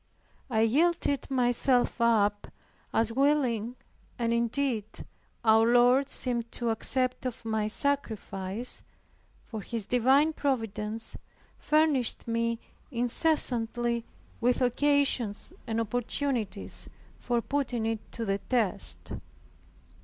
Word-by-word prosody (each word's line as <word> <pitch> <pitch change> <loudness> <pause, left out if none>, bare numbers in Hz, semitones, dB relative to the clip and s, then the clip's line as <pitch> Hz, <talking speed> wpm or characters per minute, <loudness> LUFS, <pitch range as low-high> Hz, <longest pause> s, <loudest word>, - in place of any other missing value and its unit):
I 220 -3 +1
yielded 285 +3 +1
myself 250 -1 +2
up 210 -3 +2 0.4
as 230 0 +1
willing 250 -4 +1 0.4
and 235 -1 0
indeed 235 -1 0 0.6
our 220 +1 +5
Lord 250 +3 +4
seemed 235 -2 -1
to 235 -2 -1
accept 255 +3 0
of 235 -2 -7
my 220 -1 0
sacrifice, 220 -4 -2 0.6
for 220 -2 -6
His 225 +1 -3
divine 265 +7 +3
providence 225 -6 -2 0.4
furnished 300 -7 +2
me 230 0 0 0.3
incessantly 240 -3 +1 0.4
with 245 +1 +2
occasions 255 -4 +1
and 225 0 -1
opportunities 240 +1 -2 0.3
for 240 -1 0
putting 245 -2 -2
it 225 -1 -4
to 230 - -3
the 195 -1 0
test. 230 -4 0
235 Hz, 100 wpm, -28 LUFS, 225-265 Hz, 0.6 s, our